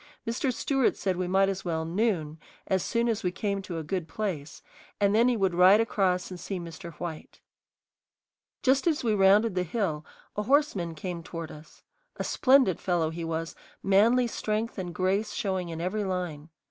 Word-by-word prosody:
Mr. 240 +3 0
Stewart 265 +1 +1
said 190 -2 -1
we 180 0 -2
might 195 +2 +3
as 195 -1 -3
well 160 -2 -2
"noon" 165 -4 -1 0.3
as 190 -1 +1
soon 235 +5 0
as 225 -2 0
we 180 - 0
came 200 +1 -2
to 180 -3 -6
a 160 - -3
good 170 +2 -3
place, 160 -6 -4 0.4
and 200 -1 +3
then 230 +3 +5
he 245 -2 +2
would 190 -3 +1
ride 185 +4 +7
across 190 -5 +1
and 180 - -7
see 195 0 -4
Mr. 170 0 -8
White. 160 0 -7 1.2
Just 270 +4 +3
as 310 -5 +1
we 225 -3 +2
rounded 205 +2 +4
the 180 - 0
hill 180 -4 -2 0.3
a 210 - -1
horseman 210 - +1
came 175 +1 -5
toward 165 -1 -7
us. 150 0 -14 0.3
A - - -2
splendid 260 - +4
fellow 170 -3 0
he 170 +1 -5
was, 165 0 -3 0.3
manly 225 +6 +4
strength 220 -1 -2
and 180 -2 -4
grace 190 +5 0
showing 190 -5 -2
in 165 -1 -5
every 190 +5 -1
line. 175 -5 -4
190 Hz, 185 wpm, -28 LUFS, 170-215 Hz, 1.2 s, ride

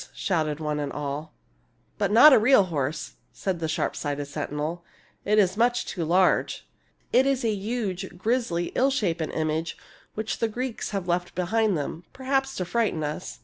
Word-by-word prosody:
" - - -29
shouted 155 -5 -1
one 150 -1 -2
and 145 -1 -3
all. 150 +2 -4 0.3
" - - -41
But 200 -2 +1
not 255 +7 +9
a - - +7
real 225 -1 +6
horse," 155 -4 -3
said 190 -3 -3
the 160 - -2
sharp 155 - -1
sighted 145 -1 -3
sentinel 150 +3 -4
— - - -31
" - - -41
it 210 - +5
is 190 -2 +4
much 240 +2 +2
too 175 - -4
large. 180 +4 +2 0.5
It 260 +2 +5
is 270 -3 +1
a 220 - +2
huge, 195 -4 -3
grizzly, 190 -4 0
ill 265 +2 +3
shapen 180 - -1
image 155 +1 -2 0.4
which 220 +1 -3
the 230 - +2
Greeks 240 +2 -4
have 195 -3 -3
left 175 0 -1
behind 200 +2 +1
them, 155 +3 -4
perhaps 270 0 -1
to 180 - -2
frighten 205 -5 0
us. 150 +4 -5
180 Hz, 190 wpm, -26 LUFS, 155-225 Hz, 0.5 s, not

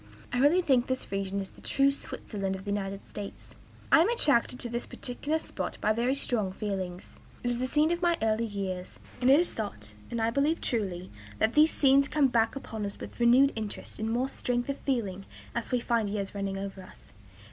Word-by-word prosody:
I 245 - +1
really 315 +7 +5
think 260 -5 +3
this 260 -5 -3
region 195 0 -1
is 195 - -7
the - - -17
true 275 0 +3
Switzerland 205 -8 -4
of 190 - -9
the 205 - -2
United 195 -1 -3
States. 205 -1 -8 0.4
"I - - +8
am 360 - +3
attracted 285 - +2
to - - -2
this 235 +1 -3
particular 285 +5 -2
spot - - -5
by 215 - +2
very 240 +4 +1
strong 220 -8 0
feelings. 190 -3 -5 0.2
It 245 - +1
is 240 - -1
the 255 - 0
scene 305 +4 +3
of 345 0 -1
my 345 -1 +3
early 220 +1 +1
years; 190 -3 -4 0.2
and 250 - +4
it 275 +3 +8
is 350 - +1
thought, 105 - -5 0.2
and 235 - -3
I 225 0 +2
believe 285 +6 +2
truly, 190 -6 -2 0.3
that 220 - +2
these 305 +1 +6
scenes 275 -1 +4
come 290 -3 +3
back 230 -1 +2
upon 225 -5 -5
us 200 0 -4
with - - -9
renewed 250 +4 +6
interest 215 -1 -6
and 220 +1 -1
more 245 +3 +1
strength 245 -1 -2
of 275 - -2
feeling 200 -8 -2 0.3
as 235 - -3
we 250 - +2
find 235 -3 +1
years 200 -1 -3
running 195 -1 -2
over 195 0 -5
us. 185 - -16
235 Hz, 210 wpm, -29 LUFS, 200-270 Hz, 0.4 s, I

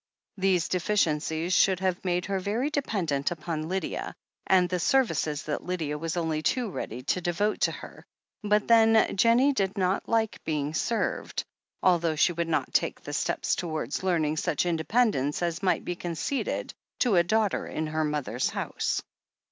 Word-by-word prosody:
These 185 -3 +2
de 180 - +1
ficiencies 165 -3 0
should 185 0 +4
have 185 -1 -1
made 180 -1 0
her 195 -1 -1
very 225 +10 -1
dependent 180 - -1
upon 160 -1 -4
Lydia, 190 +1 -3 0.3
and 185 -2 +4
the 180 0 -2
services 165 - +1
that 150 - -3
Lydia 165 -5 -2
was 165 +3 -3
only 160 -2 -1
too 230 +7 0
ready 125 -6 -5
to 180 +7 0
devote 175 +5 0
to - - +3
her, - - -10 0.4
but, 210 -1 +1
then, 225 -1 +5
Jennie 235 +7 +4
did 195 -4 -1
not 185 0 0
like 225 -2 0
being 150 -1 -2
served, 225 +8 -1 0.4
although 170 -3 +3
she 175 +3 +3
would 170 0 -2
not 160 - -1
take - - +1
the - - -7
steps - - 0
towards 160 -3 -3
learning 160 -5 +1
such 155 +1 0
independence 170 - +1
as 170 -1 -1
might 190 -2 +1
be 175 - -2
conceded 175 - -3 0.3
to 240 -6 +3
a 175 - +6
daughter 215 +3 0
in 155 - -3
her 155 +1 -1
mother's 145 -6 -1
house. - - -2
175 Hz, 165 wpm, -27 LUFS, 155-205 Hz, 0.4 s, a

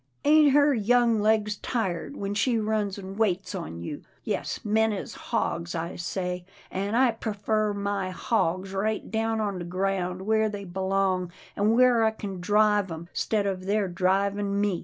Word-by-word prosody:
Ain't 300 -1 +6
her 290 0 +5
young 235 0 +3
legs 210 0 +2
tired 220 +1 -2
when 200 0 -3
she 230 +3 +1
runs 215 -2 -1
an' 195 0 -8
waits 195 -4 0
on 80 +2 -5
you. - - -6 0.2
Yes, - - -3
men 220 +1 +3
is 205 - -5
hogs, 170 +1 -2
I 165 +1 -3
say, 180 +1 -3 0.3
an' 200 +3 -2
I 255 0 +5
prefers 215 -1 -1
my 200 -2 -2
hogs 185 -1 -1
right 210 +2 -2
down 225 0 0
on 200 -3 -2
the - - -4
ground 185 0 -2
where 220 +1 +2
they 205 -1 -6
belong, 190 -1 0 0.2
an' 210 +3 +2
where 245 -2 +5
I 220 - +5
kin 200 -4 -6
drive 210 -1 +3
'em, 165 +1 -7
'stead 210 -2 0
of 190 -1 -3
their 205 0 +1
drivin' 200 +3 0
me. 200 -4 +1
200 Hz, 170 wpm, -27 LUFS, 185-220 Hz, 0.3 s, Ain't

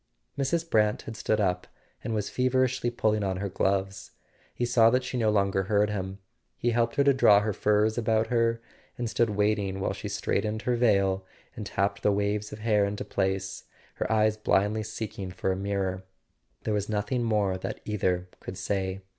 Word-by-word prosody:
Mrs. 160 +5 0
Brant 105 -7 +2
had 115 - -7
stood 110 -1 0
up 90 -3 0 0.4
and 115 - -2
was 105 -1 -1
feverishly 130 -1 +1
pulling 110 -3 0
on 95 -1 -1
her 100 +1 -3
gloves: 95 +1 -1 0.4
he 120 - -2
saw 120 -2 +5
that 125 +2 +2
she 125 0 -5
no 115 -3 +2
longer 100 -2 +1
heard 105 0 +3
him. 95 -1 -4 0.4
He 120 - 0
helped 115 0 +1
her 140 - +4
to 140 0 +5
draw 105 -6 +6
her 105 0 -1
furs 105 +3 +2
about 110 -1 +2
her, 115 -1 +2 0.4
and 120 - -2
stood 115 0 +1
waiting 105 -2 0
while - - -1
she - - -6
straightened 110 +1 -1
her 125 - +1
veil 100 -5 +2 0.3
and 105 -5 -6
tapped 100 +2 -1
the 105 - +3
waves 105 +1 -1
of 105 - -7
hair 105 -2 +3
into 100 +1 -2
place, 95 0 -2 0.3
her - - -2
eyes 110 -1 +3
blindly 105 0 +1
seeking 105 -3 -5
for 95 +1 -2
a - - 0
mirror. 95 -1 -2 0.6
There 110 - -1
was 105 0 -1
nothing 105 +4 -1
more 105 -5 +1
that - - -5
either 90 -4 0
could 95 - -8
say. 95 0 -2
105 Hz, 190 wpm, -27 LUFS, 95-115 Hz, 0.6 s, draw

